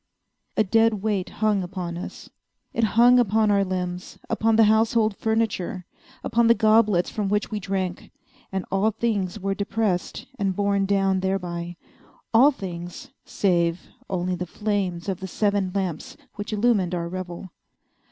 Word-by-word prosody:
A 215 Hz, -, +5 dB
dead 225 Hz, 0 st, +2 dB
weight 205 Hz, -4 st, -1 dB
hung 210 Hz, -2 st, +1 dB
upon 180 Hz, -2 st, -5 dB
us. 175 Hz, -, -8 dB, 0.5 s
It 230 Hz, -, 0 dB
hung 245 Hz, +1 st, +7 dB
upon 215 Hz, -2 st, +3 dB
our 200 Hz, -1 st, +3 dB
limbs—upon 185 Hz, +4 st, -2 dB
the 225 Hz, -, +6 dB
household 220 Hz, 0 st, +3 dB
furniture—upon 225 Hz, +2 st, -2 dB
the 235 Hz, -, +6 dB
goblets 215 Hz, -5 st, +3 dB
from 205 Hz, -3 st, -2 dB
which 210 Hz, +2 st, 0 dB
we 215 Hz, -, -2 dB
drank; 190 Hz, -2 st, -3 dB, 0.4 s
and 190 Hz, -2 st, -3 dB
all 195 Hz, +3 st, +2 dB
things 210 Hz, -4 st, -2 dB
were 195 Hz, 0 st, -1 dB
depressed, 200 Hz, -2 st, -2 dB
and 195 Hz, -2 st, 0 dB
borne 200 Hz, 0 st, +1 dB
down 195 Hz, -1 st, +2 dB
thereby—all 185 Hz, +6 st, -1 dB
things 175 Hz, -9 st, -7 dB
save 170 Hz, -3 st, 0 dB, 0.2 s
only 185 Hz, -1 st, -1 dB
the 180 Hz, 0 st, -4 dB
flames 195 Hz, -4 st, -2 dB
of 190 Hz, -2 st, -2 dB
the 190 Hz, -, -5 dB
seven 200 Hz, -1 st, 0 dB
lamps 185 Hz, -5 st, -3 dB, 0.2 s
which 205 Hz, +2 st, -6 dB
illumined 205 Hz, -5 st, +2 dB
our 170 Hz, -1 st, -3 dB
revel. 180 Hz, 0 st, -7 dB
195 Hz, 140 wpm, -24 LUFS, 180-215 Hz, 0.5 s, hung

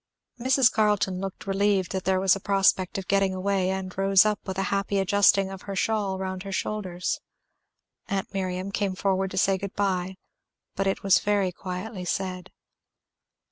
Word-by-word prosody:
Mrs. 260 Hz, 0 st, +4 dB
Carleton 210 Hz, -4 st, +1 dB
looked 195 Hz, -1 st, -6 dB
relieved 195 Hz, -1 st, +1 dB
that 190 Hz, 0 st, -3 dB
there 190 Hz, 0 st, +2 dB
was 190 Hz, 0 st, +4 dB
a -, -, -5 dB
prospect 195 Hz, -1 st, +2 dB
of 190 Hz, -, -5 dB
getting 195 Hz, -1 st, +2 dB
away, 190 Hz, 0 st, 0 dB
and 190 Hz, -1 st, -4 dB
rose 195 Hz, +1 st, +5 dB
up 210 Hz, -1 st, +1 dB
with 190 Hz, 0 st, -4 dB
a 195 Hz, -, +1 dB
happy 200 Hz, 0 st, 0 dB
adjusting 195 Hz, 0 st, +3 dB
of 190 Hz, -1 st, -8 dB
her 195 Hz, -, -3 dB
shawl 200 Hz, -1 st, 0 dB
round 190 Hz, -1 st, -4 dB
her 195 Hz, +1 st, -7 dB
shoulders. 190 Hz, -2 st, -2 dB, 0.9 s
Aunt 195 Hz, 0 st, -3 dB
Miriam 185 Hz, 0 st, -3 dB
came 195 Hz, -2 st, -1 dB
forward 190 Hz, 0 st, 0 dB
to 190 Hz, -, -7 dB
say 190 Hz, 0 st, +2 dB
good 200 Hz, 0 st, -6 dB
by, 190 Hz, -2 st, -1 dB, 0.6 s
but 195 Hz, 0 st, 0 dB
it 195 Hz, -, -1 dB
was 195 Hz, -2 st, +5 dB
very 200 Hz, -3 st, +1 dB
quietly 185 Hz, +2 st, -6 dB
said. 185 Hz, 0 st, -3 dB
195 Hz, 175 wpm, -26 LUFS, 185-200 Hz, 0.9 s, rose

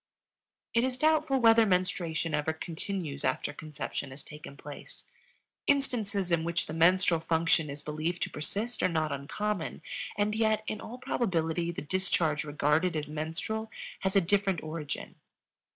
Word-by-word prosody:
It 235 Hz, -, +4 dB
is 255 Hz, -1 st, 0 dB
doubtful 310 Hz, -1 st, +3 dB
whether 230 Hz, -1 st, +7 dB
menstruation 180 Hz, -4 st, +1 dB
ever 150 Hz, +1 st, +1 dB
continues 160 Hz, -2 st, -3 dB
after -, -, 0 dB
conception 145 Hz, -2 st, -5 dB
has 130 Hz, +2 st, -10 dB
taken 150 Hz, -2 st, -10 dB
place. 145 Hz, +1 st, -10 dB, 0.6 s
Instances 215 Hz, -9 st, +1 dB
in 165 Hz, -1 st, +3 dB
which 170 Hz, 0 st, 0 dB
the 155 Hz, -, -6 dB
menstrual 170 Hz, +1 st, +4 dB
function 165 Hz, -1 st, +2 dB
is 140 Hz, +1 st, -6 dB
believed 155 Hz, +3 st, -2 dB
to -, -, -2 dB
persist 210 Hz, +10 st, -2 dB
are -, -, +3 dB
not 160 Hz, -3 st, 0 dB
uncommon, 165 Hz, +7 st, -3 dB, 0.3 s
and 210 Hz, +1 st, +2 dB
yet 220 Hz, -1 st, +2 dB
in 215 Hz, -1 st, -3 dB
all 240 Hz, -, -7 dB
probability 170 Hz, -9 st, 0 dB
the 170 Hz, -, -5 dB
discharge 165 Hz, -3 st, +1 dB
regarded 150 Hz, +4 st, +2 dB
as 150 Hz, -1 st, -2 dB
menstrual 165 Hz, +9 st, -3 dB, 0.3 s
has 190 Hz, +1 st, -1 dB
a 195 Hz, -, +7 dB
different 195 Hz, -1 st, +1 dB
origin. 155 Hz, -2 st, -5 dB
170 Hz, 150 wpm, -30 LUFS, 155-210 Hz, 0.6 s, whether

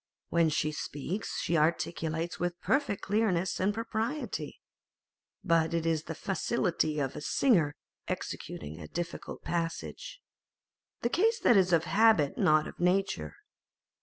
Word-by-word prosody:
When 170 Hz, -1 st, +3 dB
she 155 Hz, 0 st, 0 dB
speaks, 155 Hz, +7 st, -4 dB
she 170 Hz, -, 0 dB
articulates 165 Hz, +1 st, 0 dB
with 175 Hz, 0 st, -2 dB
perfect 265 Hz, -5 st, 0 dB
clearness 195 Hz, -4 st, +1 dB
and 190 Hz, +2 st, +2 dB
propriety, 230 Hz, +6 st, -3 dB, 0.8 s
but 165 Hz, 0 st, +2 dB
it 165 Hz, -1 st, -1 dB
is 160 Hz, -1 st, 0 dB
the 165 Hz, -, -5 dB
facility 185 Hz, -5 st, 0 dB
of 135 Hz, -2 st, -2 dB
a -, -, -5 dB
singer 165 Hz, -, +2 dB, 0.3 s
executing 75 Hz, +2 st, -5 dB
a 75 Hz, -, -8 dB
difficult 170 Hz, -, -5 dB
passage. 175 Hz, -, -4 dB, 0.8 s
The 235 Hz, -, +1 dB
case 450 Hz, -, +1 dB
is 195 Hz, -6 st, +6 dB
that -, -, +2 dB
of 165 Hz, -, +1 dB
habit, 200 Hz, -6 st, +4 dB
not 155 Hz, 0 st, +4 dB
of -, -, -11 dB
nature. 180 Hz, -, 0 dB
170 Hz, 135 wpm, -30 LUFS, 155-210 Hz, 0.8 s, is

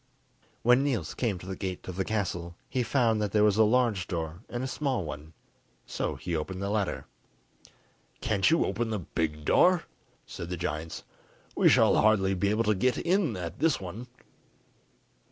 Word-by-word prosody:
When 125 Hz, +2 st, +5 dB
Niels 120 Hz, -, -1 dB
came 110 Hz, -7 st, -1 dB
to 90 Hz, -, -11 dB
the 95 Hz, 0 st, -5 dB
gate 95 Hz, -1 st, -5 dB
of 90 Hz, -, -5 dB
the 95 Hz, -, 0 dB
castle, 90 Hz, -5 st, -3 dB
he 130 Hz, -, -1 dB
found 115 Hz, -3 st, +2 dB
that 105 Hz, -2 st, -2 dB
there 105 Hz, -1 st, +4 dB
was 105 Hz, -1 st, +3 dB
a 110 Hz, -, +6 dB
large 110 Hz, -4 st, +2 dB
door 85 Hz, 0 st, -4 dB
and 120 Hz, +1 st, -4 dB
a -, -, -2 dB
small 130 Hz, -, -1 dB
one, 75 Hz, +1 st, -8 dB, 0.5 s
so -, -, -3 dB
he 85 Hz, -2 st, -4 dB
opened 90 Hz, +4 st, -4 dB
the 100 Hz, +1 st, -2 dB
latter. 105 Hz, -3 st, -1 dB, 1.1 s
"Can't 100 Hz, -3 st, +2 dB
you 165 Hz, -, +3 dB
open 110 Hz, +4 st, -2 dB
the 110 Hz, -, -1 dB
big 80 Hz, -4 st, -3 dB
door?" 180 Hz, -, +4 dB, 0.4 s
said 85 Hz, -, -7 dB
the 90 Hz, -, -3 dB
giants; 80 Hz, -1 st, -4 dB, 0.5 s
"we -, -, +5 dB
shall -, -, +5 dB
hardly 100 Hz, -3 st, +3 dB
be 95 Hz, +2 st, 0 dB
able 110 Hz, +2 st, +1 dB
to 110 Hz, -1 st, +2 dB
get 125 Hz, +6 st, +1 dB
in 170 Hz, -, +1 dB
at 85 Hz, +1 st, -6 dB
this 155 Hz, -1 st, +2 dB
one." 100 Hz, +7 st, -7 dB
100 Hz, 180 wpm, -28 LUFS, 90-120 Hz, 1.1 s, a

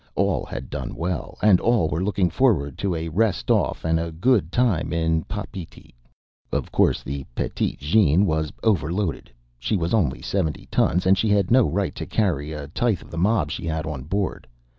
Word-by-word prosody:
All -, -, +1 dB
had -, -, -7 dB
done -, -, -5 dB
well, 85 Hz, 0 st, -3 dB
and 100 Hz, -4 st, +6 dB
all 115 Hz, -8 st, +2 dB
were 80 Hz, +4 st, -2 dB
looking 95 Hz, -3 st, +1 dB
forward 80 Hz, -, +2 dB
to 95 Hz, -4 st, 0 dB
a 80 Hz, 0 st, -3 dB
rest 105 Hz, +5 st, +1 dB
off -, -, +1 dB
and 80 Hz, 0 st, +2 dB
a 85 Hz, 0 st, -3 dB
good 90 Hz, 0 st, +2 dB
time 105 Hz, -11 st, +1 dB
in 80 Hz, -1 st, +1 dB
Papeete. 100 Hz, -4 st, -8 dB, 0.6 s
Of -, -, -2 dB
course, -, -, +2 dB
the 70 Hz, +1 st, -4 dB
Petite -, -, -2 dB
Jeanne 90 Hz, +3 st, +3 dB
was 80 Hz, -3 st, 0 dB
overloaded. 95 Hz, -3 st, 0 dB, 0.3 s
She 105 Hz, -, 0 dB
was 85 Hz, +2 st, -2 dB
only 85 Hz, -, +1 dB
seventy 80 Hz, -7 st, -2 dB
tons, 90 Hz, -, +2 dB
and 95 Hz, +1 st, +4 dB
she 110 Hz, -, +1 dB
had 100 Hz, -2 st, +2 dB
no 125 Hz, -, +5 dB
right 95 Hz, +4 st, -1 dB
to -, -, -6 dB
carry 80 Hz, -8 st, 0 dB
a 75 Hz, -2 st, -6 dB
tithe 105 Hz, +1 st, 0 dB
of -, -, -16 dB
the 85 Hz, -, -6 dB
mob 95 Hz, -5 st, +2 dB
she 80 Hz, -, -4 dB
had 80 Hz, -1 st, -2 dB
on 75 Hz, -5 st, -4 dB
board. 95 Hz, +4 st, -2 dB
85 Hz, 190 wpm, -23 LUFS, 80-105 Hz, 0.6 s, and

